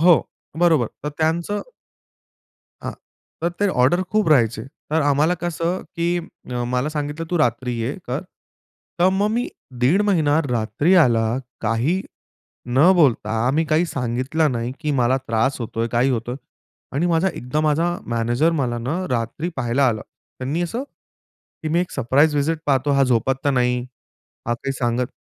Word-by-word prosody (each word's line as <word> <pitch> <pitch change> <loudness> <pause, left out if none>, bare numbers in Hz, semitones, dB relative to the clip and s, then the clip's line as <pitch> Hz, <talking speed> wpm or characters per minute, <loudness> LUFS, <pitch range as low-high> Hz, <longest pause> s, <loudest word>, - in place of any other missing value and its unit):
हो, 170 -2 +6 0.4
बरोबर 160 -9 +4 0.2
तर 150 - -2
त्यांचं. 170 +6 0 1.2
हां, - - -4 0.5
तर 170 - 0
ते 205 - +4 0.2
ऑर्डर 175 +8 +3
खूप 215 -5 +2
राहायचे, 120 -7 +3 0.3
तर 160 0 +2
आम्हाला 145 +4 +3
कसं, 175 +1 -1
की 170 0 0 0.5
अ, 120 - -1
मला 125 +4 +1
सांगितलं 150 +1 -4
तू 175 - +1
रात्री 125 -2 +1
ये 120 +5 -1 0.2
कर. 130 +5 -1 0.8
तर 180 +2 +5
मग 210 +1 +2
मी 240 +2 -1 0.3
दीड 175 +11 +4
महिना 155 -5 +3
रात्री 120 - +1
आला, 115 -4 +3 0.3
काही 120 - 0 0.6
न 135 +9 +5
बोलता. 115 -5 +2
मी 160 +4 +1
काही 165 +3 +3
सांगितलं 130 +3 0
नाही 120 +1 -2
की 150 -2 -1
मला 125 +2 +3
त्रास 115 +5 +1
होतोय, 115 0 -2
काही 120 +3 +2
होतोय 120 +1 -2 0.6
आणि 160 +6 +1
माझा 170 +2 +2
एकदा 140 -3 -3
माझा 155 +2 +2 0.2
मॅनेजर 120 +7 +1
मला 120 -3 -1
ना 125 +6 -2 0.2
रात्री 125 +7 -2
पाहायला 130 +2 +2
आला. 110 -2 -2 0.4
त्यांनी 145 +7 -1
असं 230 +10 -3
की, 160 - -13
मी 170 +3 +2
एक 180 - -3
सरप्राईज 140 +4 +3
विजिट 155 +3 +1
पाहतो, 140 0 +2
हा 140 0 +4
झोपात 125 +1 +2
तर 145 - +3
नाही, 125 -2 +2 0.7
हा 120 - +2
काही 135 +3 -4
सांगत 125 -1 0
140 Hz, 155 wpm, -22 LUFS, 120-165 Hz, 1.2 s, हो